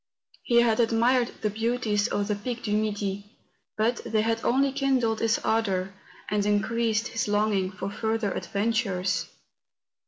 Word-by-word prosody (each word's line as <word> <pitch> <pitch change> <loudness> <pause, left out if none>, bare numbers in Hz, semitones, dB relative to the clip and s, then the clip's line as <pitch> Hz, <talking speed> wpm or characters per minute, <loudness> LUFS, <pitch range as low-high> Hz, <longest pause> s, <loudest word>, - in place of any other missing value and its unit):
He 235 -2 +4
had 225 -1 +2
admired 235 +2 +3
the 215 - 0
beauties 220 -1 0
of 205 0 -1
the 210 - 0
Pic 235 +4 -5
du 210 -1 0
Midi; 205 0 -3 0.4
but 230 +3 +1
they 220 -2 0
had 225 +1 -1
only 270 +2 +2
kindled 260 -5 +1
his 225 0 +2
ardour 195 -4 0 0.3
and 210 0 0
increased 220 +2 +1
his 225 - -2
longing 205 -2 +1
for 195 +1 -5
further 220 -1 -1
adventures. 200 -3 -1
220 Hz, 145 wpm, -26 LUFS, 205-230 Hz, 0.4 s, He